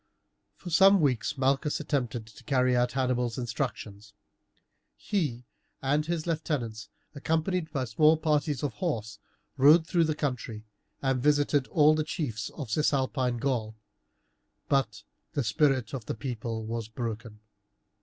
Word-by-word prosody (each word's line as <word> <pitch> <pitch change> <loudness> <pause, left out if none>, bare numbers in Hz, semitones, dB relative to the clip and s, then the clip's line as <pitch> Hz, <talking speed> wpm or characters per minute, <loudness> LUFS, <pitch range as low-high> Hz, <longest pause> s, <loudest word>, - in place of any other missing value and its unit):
For 175 - -9
some 195 +4 +6
weeks 140 -2 0
Malchus 135 +3 +1
attempted 125 -6 -2
to 110 -2 -16
carry 130 -3 +2
out 125 0 +1
Hannibal's 125 -3 0
instructions; 105 -3 -4 0.8
he 145 - -2 0.3
and 145 +3 0
his 170 -2 -2
lieutenants, 140 -10 -3 0.2
accompanied 160 +3 -1
by 135 -4 -1
small 155 +7 +4
parties 150 -3 0
of 140 -5 -1
horse, 110 - -3 0.4
rode 150 +5 +6
through 170 -1 +2
the 155 -1 -1
country 120 -7 -4 0.4
and 135 -2 +1
visited 145 -1 +2
all 155 -1 +5
the 155 0 0
chiefs 135 - -4
of 130 -8 -6
Cisalpine 130 -3 +1
Gaul, 115 -4 -2 0.9
but 135 -1 0 0.3
the 145 -3 0
spirit 130 0 +1
of 125 -5 -5
the - - -2
people 115 -2 -4
was 115 -1 -4
broken. 115 -2 -6
135 Hz, 135 wpm, -28 LUFS, 115-150 Hz, 0.9 s, some